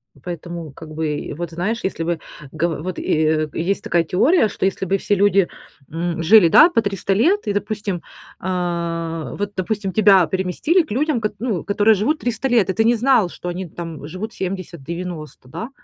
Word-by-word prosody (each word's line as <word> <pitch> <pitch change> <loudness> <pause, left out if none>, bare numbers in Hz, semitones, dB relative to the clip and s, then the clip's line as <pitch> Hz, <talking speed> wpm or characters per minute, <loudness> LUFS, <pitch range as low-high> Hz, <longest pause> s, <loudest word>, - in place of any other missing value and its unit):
И - - -20
поэтому, 170 +1 -7
как 160 +2 -11
бы, 150 -1 -3
вот 170 -1 -4
знаешь, 205 +8 -2
если 190 -3 -2
бы 170 0 -1 0.3
го 160 +2 0
вот 185 +2 -5
и, - - -5 0.2
э, 155 0 +1
есть 190 +4 -1
такая 170 -1 +2
теория, 225 - +3
что 200 - -3
если 190 0 -1
бы 195 +2 +1
все 205 - 0
люди, 200 -2 +3 0.4
м, 165 +1 -2
жили 195 +1 +7
да 310 - +7
по 340 - +2
300 195 -2 -1
лет 345 - +2
и 205 - +1
допустим, 205 -3 -3 0.4
э, 170 -4 -3
вот 205 0 -3
допустим 195 +1 -2
тебя 195 -2 +5
переместили 190 - +1
к 310 - -14
людям, 275 +1 0
кот 210 -1 -2
ну 220 -6 -2
которые 205 +2 +3
живут 250 +11 0
300 245 +2 -2
лет 235 -6 +3
и - - +1
ты 220 - +2
не 235 +2 +4
знал, 230 -5 +3
что 175 - -7
они 180 +1 -4
там 165 -3 -7
живут 200 +8 -6
70 185 - -5
90, 170 -4 -7
да, 225 - -6
185 Hz, 195 wpm, -20 LUFS, 170-215 Hz, 0.4 s, жили